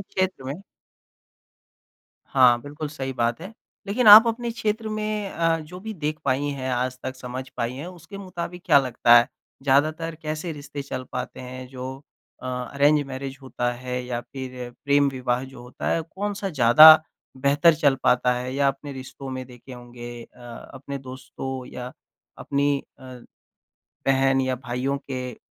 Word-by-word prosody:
क्षेत्र 185 -6 -2
में 140 +8 -5 1.7
हाँ, 125 -3 +5
बिल्कुल 145 +1 -6
सही 135 -3 -5
बात 120 +2 -1
है। 190 +6 -8 0.3
लेकिन 225 +4 0
आप 220 +3 +11
अपने 235 +1 -2
क्षेत्र 220 -1 -2
में 215 -1 -2
अ, 165 -1 +1
जो 180 +4 -10
भी 220 +1 -6
देख 155 -3 -3
पाई 140 +2 +1
है, 130 -2 -3
आज 125 +1 -1
तक 130 0 -4
समझ 130 +1 -7
पाई 115 +1 -2
है 145 +6 -7
उसके 185 +3 -11
मुताबिक 180 -2 -6
क्या 140 - +7
लगता 120 -2 +4
है? 120 - +2 0.3
ज़्यादातर 155 +4 +1
कैसे 155 +2 -4
रिश्ते 145 -1 -7
चल 130 -2 -5
पाते - - -5
हैं 130 0 -8
जो 130 0 -7 0.5
अ, - - -6
अरेंज 140 +4 +2
मैरेज 135 0 -6
होता 125 -2 -2
है 125 +1 -4
या 120 -1 -3
फ़िर 125 0 -8
प्रेम-विवाह 135 -3 +1
जो 130 -2 -12
होता 125 - -5
है। 165 - 0
कौन-सा 195 +4 -4
ज़्यादा 155 +3 +9 0.4
बेहतर 145 +5 +4
चल 145 -3 +3
पाता 125 0 +3
है 125 +1 -4
या 140 0 +3
अपने 140 +1 -5
रिश्तों 135 +1 -9
में 130 0 -5
देखे 125 +1 -13
होंगे 120 -1 -9
अ, - - -19 0.4
अपने 140 +1 -6
दोस्तों 130 0 -7
या 125 0 -7 0.5
अपनी 140 0 0 0.2
अ, - - -17 1.0
बहन 135 0 +3
या 130 0 0
भाइयों 125 +2 -2
के 125 -2 -4
135 Hz, 160 wpm, -24 LUFS, 125-155 Hz, 1.7 s, आप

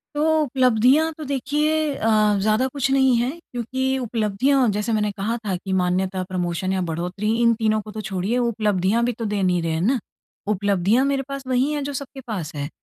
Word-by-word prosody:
तो 295 - +1 0.2
उपलब्धियाँ 260 +3 +3
तो 310 - -6
देखिए 285 +3 0 0.2
अ, 215 -2 +2
ज़्यादा 215 +5 +2
कुछ 275 0 -2
नहीं 265 -2 +4
है, 240 +2 +1 0.2
क्योंकि 260 +2 -1
उपलब्धियाँ 245 +3 +1
जैसे 210 +3 -2
मैंने 210 -1 +1
कहा 220 +4 -1
था 195 -3 0
कि 190 +2 -5
मान्यता, 185 +1 0
प्रमोशन 185 0 -2
या 190 - 0
बढ़ोतरी 180 +6 -2
इन 235 0 +5
तीनों 215 -1 +1
को 215 +1 -10
तो 215 +1 -5
छोड़िए 195 +3 -2
उपलब्धियाँ 215 -3 +1
भी 245 - 0
तो 230 0 -5
दे 205 -1 -1
नहीं 180 -2 +2
रहे 165 - -1
हैं 160 0 -1
ना, 245 +7 +2 0.5
उपलब्धियाँ 205 +4 +2
मेरे 275 -1 0
पास 275 -1 -5
वहीं 260 +3 +1
हैं 295 -1 -2
जो 285 +1 -4
सबके 275 0 -7
पास 180 -7 -4
हैं। 145 0 -4
220 Hz, 195 wpm, -22 LUFS, 195-260 Hz, 0.5 s, इन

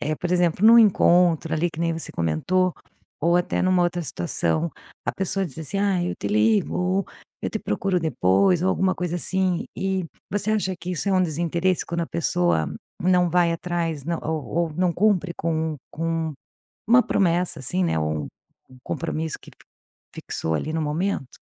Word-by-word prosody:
eh, 155 - -1
por 180 - -4
exemplo, 175 +1 +2
num 230 +1 +9
encontro 175 -6 +4
ali 160 +2 +1
que 165 - -8
nem 165 -1 +1
você 165 - -6
comentou, 175 - +1 0.5
ou 170 +3 +3
até 175 - 0
numa 185 -1 +3
outra 175 0 0
situação, 85 - -1 0.3
a - - -1
pessoa 195 +1 -1
diz 160 -4 -8
assim: 160 +5 -4
"Ai 190 -3 +1
eu - - -3
te - - -5
ligo, 110 - +2 0.4
eu - - -2
te 220 - -2
procuro 195 -3 -1
depois", 160 - +2
ou 190 - +2
alguma 190 0 +2
coisa 175 -1 -2
assim, 185 0 -1
e, 190 -2 -1 0.3
você 205 +1 0
acha 190 -3 0
que 175 +1 -6
isso 180 +4 -2
é 195 - +2
um 185 -1 +4
desinteresse 170 +2 0
quando 170 0 -3
a 165 - -3
pessoa 170 - 0 0.3
não 180 0 +3
vai 170 0 +3
atrás 165 -4 -2
não 170 0 -2
ou 155 -2 -2 0.3
ou 150 - -11
não 180 +1 +2
cumpre 190 -2 +2
com 160 -1 -1
com 165 0 -2 0.5
uma 245 +3 +6
promessa, 175 - +1
assim, 180 +8 -1
né, 165 - +1
ou 75 -1 -1
um - - -8 0.4
um 130 - -15
compromisso 160 -1 -3
que - - -17
f - - -22 0.5
fixou 80 - -3
ali 155 - -2
no 160 - 0
momento? 150 -2 -2
175 Hz, 185 wpm, -24 LUFS, 160-185 Hz, 0.5 s, num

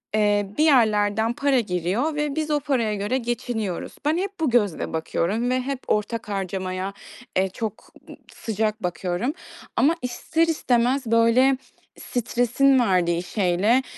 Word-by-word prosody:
eee, 205 -1 +2
bir 305 - +4
yerlerden 220 -5 +3
para 275 +1 +2
giriyor 205 - -1
ve 295 -1 -1
biz 310 -1 -2
o 295 - +2
paraya 245 -7 0
göre 205 +6 -1
geçiniyoruz. 235 -5 -3
Ben 305 +3 +2
hep 395 +1 -4
bu 315 -4 +1
gözle 210 -11 +1
bakıyorum 190 +8 -1
ve 255 0 +1
hep 270 +1 -3
ortak 210 +1 -1
harcamaya, 190 -1 -3 0.4
eee, 190 +1 +2
çok 220 +2 -6 0.4
sıcak 220 0 -2
bakıyorum. 180 - -2 0.4
Ama 315 +5 +3
ister 320 +6 0
istemez, 255 -4 +1
böyle, 230 +4 +4 0.4
stresin 245 +3 +2
verdiği 180 -6 +2
şeyle, 200 +6 +2
230 Hz, 135 wpm, -24 LUFS, 200-265 Hz, 0.4 s, bir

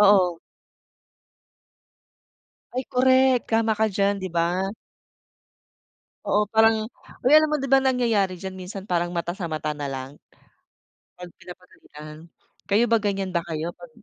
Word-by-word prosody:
oo. 190 -5 +4 2.3
Ay, 255 - -2
korek. 260 0 +4
Tama 225 0 +2
ka 220 - +3
diyan, 200 +1 +1
di 185 - -3
ba. 180 +4 0 1.5
Oo, 210 - +2
parang 220 0 +3 0.3
uy, 260 - +3
alam 310 0 +5
mo 300 - +3
di 275 - -3
ba, 270 0 +4
nangyayari 225 -8 +1
diyan 190 -1 -7
minsan 190 +1 -8
parang 175 0 -1
mata 175 +1 -3
sa 190 - -5
mata 155 -2 -3
nalang, 135 -1 -6 1.0
'pag 180 -1 -11
pinapagalitan? 155 -4 -13 0.5
Kayo 210 +4 +4
ba 230 -1 +3
ganiyan 195 -2 -2
ba 170 - +1
kayo 160 +2 -4
pag 175 -1 -14
195 Hz, 135 wpm, -24 LUFS, 175-225 Hz, 2.3 s, alam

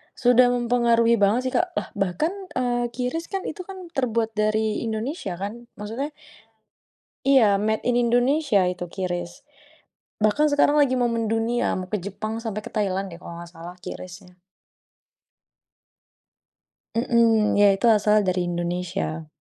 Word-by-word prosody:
Sudah 245 0 +5
mempengaruhi 235 -2 +2
banget, 205 +5 +3
sih, - - -14
Kak. 360 0 0
Lah, - - -3
bahkan, 200 - -1 0.2
eee, 240 -1 0
QRIS, 250 +8 -4
kan, 390 -2 -4
itu, 355 +3 -6
kan 375 -3 -9
terbuat 230 -5 0
dari 215 0 0
Indonesia, 220 - -3
kan. 215 +6 -7
Maksudnya 240 +9 -5 1.1
Iya, 230 -8 +5
made 220 +1 0
in 245 0 +1
Indonesia 245 -1 +2
itu 180 -1 -5
QRIS. 175 +2 -5 0.8
Bahkan 215 +9 +3
sekarang 290 +1 +4
lagi 275 -3 +4
mau 245 -2 +1
mendunia. 230 +1 0
Mau 185 0 -5
ke 210 - 0
Jepang 205 +4 -5
sampai 220 -2 -4
ke - - -9
Thailand, 195 -2 -1
deh, 170 - -10
kalau 170 -1 -9
gak 170 - -11
salah 175 +1 -10
QRIS-nya. 180 0 -9 2.6
Mhm. 230 -3 +3
Ya, 200 -1 +6
itu 230 +4 +3
asalnya 210 -2 +3
dari 180 -1 -1
Indonesia. 175 -2 -3
220 Hz, 140 wpm, -24 LUFS, 195-245 Hz, 2.6 s, Ya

